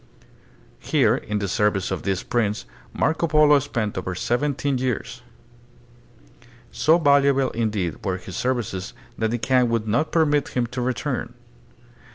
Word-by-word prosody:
Here - - +2
in 105 - -3
the 100 -1 -2
service 100 -1 0
of 95 - -2
this 95 -1 -2
prince 105 - -1 0.3
Marco 160 - 0
Polo 150 -2 +5
spent 120 -8 -3
over 90 0 -4
seventeen 135 +4 -1
years. 125 -3 -3 1.5
So 160 +2 +3
valuable 140 -4 +3
in 115 -1 0
deed 95 -6 -3
were 95 -2 -1
his 95 -1 -9
services 115 -7 -2 0.2
that 110 0 +1
the 120 - -1
Kaan 125 0 +2
would 115 -1 -1
not 120 +9 0
permit 150 -3 +2
him 120 - +2
to 125 +2 -5
return. 125 0 -3
120 Hz, 145 wpm, -23 LUFS, 105-140 Hz, 1.5 s, Polo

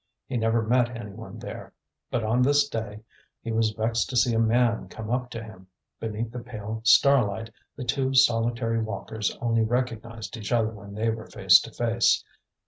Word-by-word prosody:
He 130 - -5
never 115 0 +1
met 120 +1 +1
any 105 -3 -7
one 110 +3 -10
there. - - -8 0.4
But 120 - -1
on 115 +3 +1
this 145 +3 +4
day 110 -5 -5 0.4
he 115 - -5
was 110 0 +2
vexed 110 +1 -1
to 130 - -2
see 120 0 +3
a 115 - +2
man 115 0 +2
come 110 0 -7
up 125 0 -1
to 115 -1 -6
him. 95 -4 -13 0.3
Beneath 110 +1 -4
the 125 - -6
pale 110 -2 -6
starlight, 115 -3 +4 0.2
the 130 - -6
two 130 +2 0
solitary 115 -2 +3
walkers 110 -1 -3
only 115 -1 +2
recognized 115 -3 -3
each 105 -2 -6
other 115 -2 +2
when 100 -2 -11
they 115 +1 +1
were 110 0 -7
face - - +6
to - - -8
face. 120 -1 +2
115 Hz, 185 wpm, -26 LUFS, 110-120 Hz, 0.4 s, face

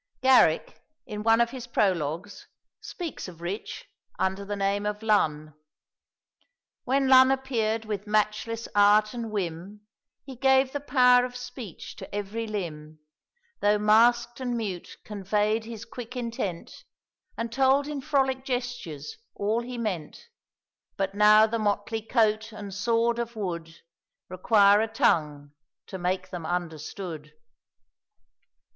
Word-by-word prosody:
Garrick, 255 -12 +4 0.2
in 210 -4 -6
one 225 +1 +4
of 235 0 +2
his 255 -2 -8
prologues, 185 -3 -1 0.3
speaks 340 - -6
of 175 -3 -11
Rich, 180 +5 -6 0.3
under 190 +1 -1
the 205 +1 -4
name 200 +1 0
of 210 +1 -4
Lun 155 -8 +1 1.3
"When 270 +1 +1
Lun 260 0 +7
appeared 230 -5 -1
with 210 -1 -5
matchless 215 +2 -1
art 210 +1 +4
and 235 -2 -5
whim, 195 0 -5 0.4
He 270 -1 -9
gave 265 +1 +3
the 285 - -3
power 250 -3 +4
of 250 0 -5
speech 250 - -8
to - - -9
every 210 +3 -4
limb; 155 -7 -6 0.6
Though 205 +1 +3
masked 235 +3 +3
and 245 -2 -2
mute, 195 -6 -5
convey'd 210 +2 -1
his 230 -1 -8
quick 245 0 -9
intent, 230 -8 -5 0.5
And 230 0 -3
told 270 +3 +3
in 295 -2 -4
frolic 265 -2 0
gestures 245 - -5 0.2
all 215 +3 0
he 245 +1 -7
meant; 215 - -5 0.7
But 195 -1 -1
now 210 +1 +6
the 225 +1 -2
motley 210 +1 -1
coat 220 -1 +1
and 205 -2 -8
sword 230 +3 +1
of 235 0 -4
wood 170 -5 -5 0.5
Require 200 +2 +4
a 225 - 0
tongue 150 -9 0 0.3
to 190 - -8
make 185 +1 -2
them 175 -2 -6
understood." 160 -1 -5
215 Hz, 130 wpm, -26 LUFS, 195-240 Hz, 1.3 s, Lun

